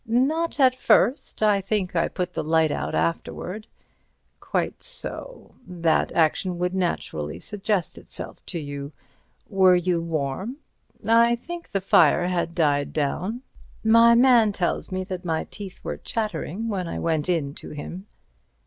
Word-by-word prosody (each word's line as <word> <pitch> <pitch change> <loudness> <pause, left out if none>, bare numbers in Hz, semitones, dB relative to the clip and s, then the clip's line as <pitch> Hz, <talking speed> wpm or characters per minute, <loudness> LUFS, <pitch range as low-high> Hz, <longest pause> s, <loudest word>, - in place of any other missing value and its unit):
"Not 290 +9 +1
at 260 -2 +6
first. 255 -2 +2
I 205 -2 +4
think 195 -2 -2
I 165 0 +2
put 180 0 -4
the - - -2
light 160 0 +2
out - - -2
afterwards." 180 +5 -2 0.7
"Quite - - -2
so—that 180 - -1
action 175 +3 +1
would 180 +1 -1
naturally 80 - -2
suggest 205 - -2
itself - - -9
to - - -3
you. 145 -1 -6 0.5
Were 190 -3 +5
you 175 -1 +1
warm?" 165 - -3 0.5
"I 230 +1 +5
think 340 +8 -8
the 195 - -1
fire 180 -2 +4
had 170 -2 -1
died 145 -4 +1
down. 185 - -2 0.4
My 230 +1 +6
man 240 -3 +5
tells 180 -1 -2
me 185 0 -2
that 185 -1 -6
my 160 -3 -1
teeth 200 -3 -8
were - - -4
chattering 220 -2 -3
when 190 -5 -2
I - - -4
went 160 0 -1
in 155 -6 0
to - - -9
him." 175 +6 -8
185 Hz, 145 wpm, -24 LUFS, 165-225 Hz, 0.7 s, at